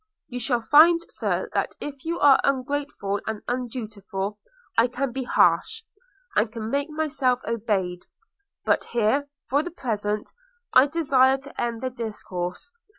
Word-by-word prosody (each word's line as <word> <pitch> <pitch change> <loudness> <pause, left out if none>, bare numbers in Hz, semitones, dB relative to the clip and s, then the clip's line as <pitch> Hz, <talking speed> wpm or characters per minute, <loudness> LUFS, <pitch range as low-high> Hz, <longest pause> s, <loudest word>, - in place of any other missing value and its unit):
You 250 -2 -4
shall 240 0 +1
find, 320 +7 +7
Sir, - - -2
that - - -1
if 280 -1 -7
you 335 +1 -2
are 280 -2 +6
ungreateful 275 -6 -1
and 220 -1 -4
undutiful, 215 -5 -4 0.4
I 230 +2 +5
can 255 +1 -2
be 260 +1 -4
harsh, 445 - +2 0.5
and 210 +1 +2
can 225 -1 -5
make 280 +2 0
myself 295 -5 0
obeyed. 195 -6 -1 0.6
But - - +2
here, 240 +5 +1 0.2
for 280 +3 +2
the 350 - -5
present, 210 - -3 0.4
I 260 +2 +7
desire 275 -4 +3
to 270 +1 -8
end 235 -1 -2
the 260 - -1
discourse. 210 - -5
250 Hz, 145 wpm, -25 LUFS, 215-280 Hz, 0.6 s, find